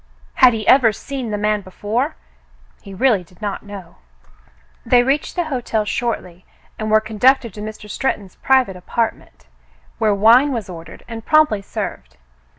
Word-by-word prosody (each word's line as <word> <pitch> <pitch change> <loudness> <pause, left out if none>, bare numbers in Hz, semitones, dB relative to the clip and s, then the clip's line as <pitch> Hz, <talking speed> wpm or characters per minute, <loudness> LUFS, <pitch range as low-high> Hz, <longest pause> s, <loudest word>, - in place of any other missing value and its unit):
Had 255 -3 +6
he 215 -2 -4
ever 255 -4 +6
seen 260 +3 -6
the 210 - -2
man 210 0 0
before? 210 - -3 0.7
He 200 - -12
really 205 -1 +2
did 175 0 -23
not 205 -2 -4
know. 200 -4 -11 0.9
They 245 -1 +4
reached 275 +3 -1
the 350 - 0
hotel 245 -8 -2
shortly 185 -6 -3 0.4
and 215 0 -3
were 215 0 +5
conducted 220 +2 +2
to 210 - -9
Mr. 215 0 -8
Stretton's 205 -5 -3
private 260 -7 +2
apartment, 225 +5 -4 0.5
where 210 -2 +2
wine 235 +8 +5
was 220 -7 -4
ordered, 165 -1 -11
and 225 -1 -7
promptly 310 -9 +3
served. 65 - -6
215 Hz, 155 wpm, -19 LUFS, 200-250 Hz, 0.9 s, Had